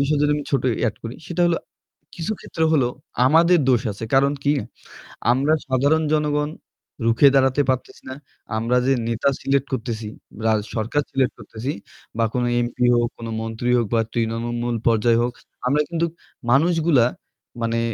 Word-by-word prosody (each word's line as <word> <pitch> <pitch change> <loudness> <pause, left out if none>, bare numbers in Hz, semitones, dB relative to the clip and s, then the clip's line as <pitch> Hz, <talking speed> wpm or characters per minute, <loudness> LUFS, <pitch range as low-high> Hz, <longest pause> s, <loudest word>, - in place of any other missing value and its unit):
বিষয় 145 +2 +1
যদি 150 - +3
আমি 150 - -3
ছোট 140 - +1 0.2
add 110 - -1
করি 115 +2 -6
সেটা 175 0 -3
হলো 170 -1 +2 0.6
কিছু 170 +5 -3
ক্ষেত্রে 160 - -2
হলো 140 -6 +3 0.4
আমাদের 170 +4 +5
দোষ 125 -3 +4
আছে। 110 +3 -7
কারণ 140 +1 +4
কি? 145 - +4 0.8
আমরা 140 +5 +2
সাধারণ 140 +5 +2
জনগণ 150 -1 +1 0.6
রুখে 115 +5 +5
দাঁড়াতে 135 +1 +3
পারতেছি 130 -1 -2
না। 130 - -5 0.4
আমরা 115 +3 +1
যে 135 - +3 0.2
নেতা 115 +4 +1
select 140 0 +1
করতেছি 115 -3 -3 0.4
রা 110 - +4 0.2
সরকার 115 +6 0
select 135 -2 +1
করতেছি 115 +5 -5 0.5
বা 115 - +2
কোন 125 - 0 0.2
MP 120 - -8 0.2
হোক, 120 0 +2
কোন 115 - -7
মন্ত্রী 115 +2 -3
হোক 120 - +1
বা 115 - +3
তৃণমূল 120 +1 -2
পর্যায় 115 +1 +3
হোক, 120 +1 0 0.4
আমরা 145 +3 +3
কিন্তুক 170 -1 -1 0.4
মানুষগুলা 160 -3 +4 0.6
মানে 115 0 0
130 Hz, 155 wpm, -22 LUFS, 115-150 Hz, 0.8 s, আমাদের